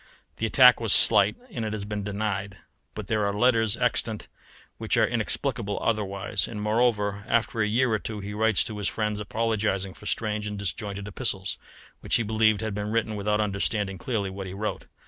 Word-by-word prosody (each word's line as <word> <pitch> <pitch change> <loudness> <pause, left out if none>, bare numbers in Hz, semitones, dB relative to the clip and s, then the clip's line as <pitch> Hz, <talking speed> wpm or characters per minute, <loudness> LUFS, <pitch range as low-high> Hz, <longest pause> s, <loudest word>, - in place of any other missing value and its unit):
The - - -1
attack - - +7
was - - +3
slight, - - +6 0.2
and 120 - -4
it 110 -1 -3
has 105 -2 -3
been 105 0 -4
denied; 100 -1 -3 0.4
but 105 - -5
there 110 +1 0
are 100 - +1
letters 115 -2 +3
extant 115 -3 -1 0.5
which - - 0
are - - +5
inexplicable 115 -2 -2
otherwise, 100 -3 -1
and 105 - -6
moreover 105 -2 +1
after 115 -1 +1
a 105 - +2
year 120 +3 +2
or 110 - +1
two 110 0 -5
he 100 +1 -6
writes 110 -1 +2
to 105 -1 -4
his 100 - -1
friends 105 -1 -2
apologizing 105 -3 -1
for 105 - -11
strange 105 -1 -2
and 105 0 -5
disjointed 100 +1 -4
epistles, 95 -1 -2 0.4
which - - 0
he 115 - +3
believed 110 -1 +2
he - - -3
had 110 -2 -3
written 110 +1 -1
without 105 +1 0
understanding 100 -1 -1
clearly 100 -3 -2
what 95 0 -6
he 95 - -7
wrote. 105 +2 -4
105 Hz, 190 wpm, -26 LUFS, 100-110 Hz, 0.5 s, attack